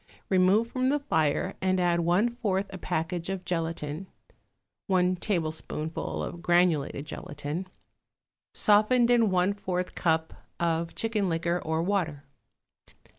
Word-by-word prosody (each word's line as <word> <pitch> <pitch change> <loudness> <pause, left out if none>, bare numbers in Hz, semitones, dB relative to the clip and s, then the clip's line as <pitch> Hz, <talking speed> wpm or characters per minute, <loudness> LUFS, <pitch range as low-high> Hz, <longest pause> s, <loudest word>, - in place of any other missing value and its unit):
Remove 190 +4 +4
from 255 0 +1
the 290 - +3
fire 160 - 0
and 185 0 +2
add 175 -1 +2
one 185 +8 +2
fourth 200 -5 0
a 190 - -6
package 170 +2 -2
of 190 -1 -4
gelatine 165 0 -3 0.8
(one 185 -1 +3
tablespoonful 160 -4 -2
of 170 - -6
granulated 175 -5 +2
gelatine), 150 +3 -5 0.8
softened 235 +4 +4
in 230 -3 +4
one 185 +1 +2
fourth 185 -3 -3
a - - -22
cup 160 -1 0 0.3
of 165 0 -1
chicken 215 -4 0
liquor 170 +1 0
or 160 +1 0
water. 170 -7 -1
180 Hz, 125 wpm, -28 LUFS, 165-200 Hz, 0.8 s, Remove